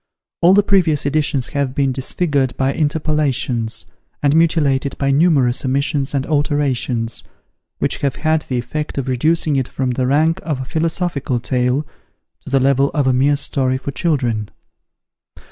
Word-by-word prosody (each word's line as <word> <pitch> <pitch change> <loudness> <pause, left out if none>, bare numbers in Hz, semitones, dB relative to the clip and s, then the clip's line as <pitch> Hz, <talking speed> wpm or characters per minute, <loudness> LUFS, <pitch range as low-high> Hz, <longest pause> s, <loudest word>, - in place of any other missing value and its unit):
All 180 +3 +6
the 205 - +5
previous 175 -9 +2
editions 145 -2 0
have 140 -2 -2
been 135 -2 +1
disfigured 135 0 -1
by 135 +1 +1
interpolations, 145 -7 0 0.4
and 145 +1 +3
mutilated 145 -5 +2
by 140 -1 0
numerous 140 -5 +2
omissions 140 +1 -1
and 135 -1 0
alterations, 140 -6 -1 0.5
which - - -1
have 140 -2 -1
had 155 0 +1
the 130 - -1
effect 150 +6 -4
of 135 -1 -2
reducing 150 +3 +1
it 130 -2 -1
from 130 -1 -2
the 125 +1 -1
rank 160 +6 +2
of 155 -4 -3
a 130 - -4
Philosophical 160 -4 -1
Tale, 125 +4 0 0.6
to - - -9
the 135 0 +2
level 135 +1 +3
of 145 -3 +1
a 130 - +3
mere 140 +3 +3
story 135 -2 0
for 130 +2 -5
children. 125 - -1
140 Hz, 155 wpm, -18 LUFS, 130-155 Hz, 0.6 s, All